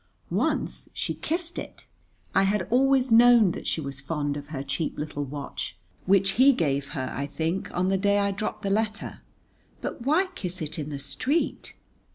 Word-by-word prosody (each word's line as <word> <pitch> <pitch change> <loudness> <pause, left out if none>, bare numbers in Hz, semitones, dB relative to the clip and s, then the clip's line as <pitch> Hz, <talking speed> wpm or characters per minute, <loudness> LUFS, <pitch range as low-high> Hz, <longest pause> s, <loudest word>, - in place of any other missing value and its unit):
Once - - -1
she - - -2
kissed 340 +1 -2
it. - - -9 0.5
I - - +5
had 195 -1 +1
always 265 0 +4
known 230 -3 +7
that - - -6
she - - 0
was 140 -2 -6
fond 145 0 -2
of 145 0 -6
her 140 -3 -5
cheap 140 +4 -2
little 150 -1 -3
watch, 140 0 -5 0.3
which 195 0 +4
he 280 +1 +8
gave 140 - 0
her, 130 -1 -3
I 140 +1 -2
think, 165 +5 -2
on 185 +1 0
the 195 0 +2
day 200 +1 +3
I 200 0 +2
dropped 210 +2 -4
the 195 - 0
letter, 215 +1 -1 0.6
but - - -5
why 310 +10 +3
kiss 185 - -3
it 155 0 -4
in 150 0 -4
the 145 - -4
street? 265 - -1
190 Hz, 185 wpm, -26 LUFS, 145-225 Hz, 0.6 s, he